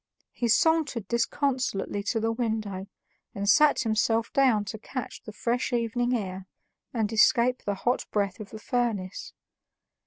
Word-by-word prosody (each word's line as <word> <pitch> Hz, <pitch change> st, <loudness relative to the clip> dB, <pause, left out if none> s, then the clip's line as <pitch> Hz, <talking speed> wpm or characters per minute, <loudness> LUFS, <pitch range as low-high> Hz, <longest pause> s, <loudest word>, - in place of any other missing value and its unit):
He 240 Hz, -, -2 dB
sauntered 280 Hz, -, +2 dB
disconsolately 235 Hz, -4 st, -1 dB
to 225 Hz, +1 st, 0 dB
the 225 Hz, +1 st, 0 dB
window 215 Hz, -5 st, -3 dB, 0.5 s
and 200 Hz, 0 st, -3 dB
sat 290 Hz, +8 st, +5 dB
himself 225 Hz, 0 st, +1 dB
down 250 Hz, -7 st, +3 dB
to 205 Hz, +2 st, -6 dB
catch 255 Hz, +3 st, -6 dB
the 215 Hz, -, -9 dB
fresh 235 Hz, +5 st, -1 dB
evening 240 Hz, +1 st, 0 dB
air 190 Hz, -2 st, -6 dB, 0.4 s
and 225 Hz, -5 st, -1 dB
escape 235 Hz, +3 st, +4 dB
the 205 Hz, -, -2 dB
hot 245 Hz, +6 st, -1 dB
breath 200 Hz, -2 st, -1 dB
of 210 Hz, -2 st, -8 dB
the 220 Hz, -, -8 dB
furnace. 215 Hz, -5 st, -2 dB
225 Hz, 145 wpm, -27 LUFS, 205-245 Hz, 0.5 s, sat